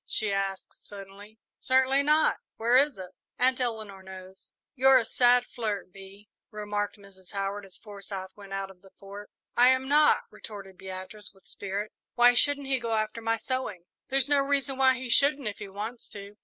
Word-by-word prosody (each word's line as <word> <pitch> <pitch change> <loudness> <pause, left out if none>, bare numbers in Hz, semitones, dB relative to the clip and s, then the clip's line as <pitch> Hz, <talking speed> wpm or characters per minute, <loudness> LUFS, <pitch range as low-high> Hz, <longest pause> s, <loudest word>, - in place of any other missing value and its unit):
she 215 -2 -1
asked, 195 -1 -4
suddenly. 205 +2 -12 0.2
"Certainly 265 +1 +3
not 300 +2 +3 0.2
where 235 +2 +2
is 280 0 +4
it?" 185 -1 -9 0.3
"Aunt 255 +1 +2
Eleanor 220 -5 -3
knows." 190 0 -12 0.2
"You're 265 -1 +6
a 240 - +1
sad 245 +1 +4
flirt, 205 -7 -4
Bee," 195 +1 -13 0.2
remarked 205 -1 -3
Mrs. 195 -2 -17
Howard, 200 0 -3
as 190 - -16
Forsyth 195 -3 -8
went 200 -1 -13
out 195 0 -4
of 180 -1 -20
the 195 - -17
Fort. 200 +1 -10 0.3
"I 245 - +6
am 260 +1 +3
not," 300 +2 +4
retorted 195 -3 -10
Beatrice, 190 +2 -8
with 195 - -25
spirit. 200 +2 -5 0.2
"Why 245 0 +7
shouldn't 285 +3 +2
he 265 -1 +1
go 230 -2 -1
after 215 +1 -2
my 225 0 0
sewing?" 255 -8 -3 0.3
"There's 270 +1 +2
no 285 -1 +3
reason 275 -1 0
why 260 0 +4
he 255 0 -6
shouldn't, 280 +1 +2
if 205 - -4
he 210 - -7
wants 215 +5 -7
to." 200 0 -10
215 Hz, 185 wpm, -28 LUFS, 195-260 Hz, 0.3 s, Why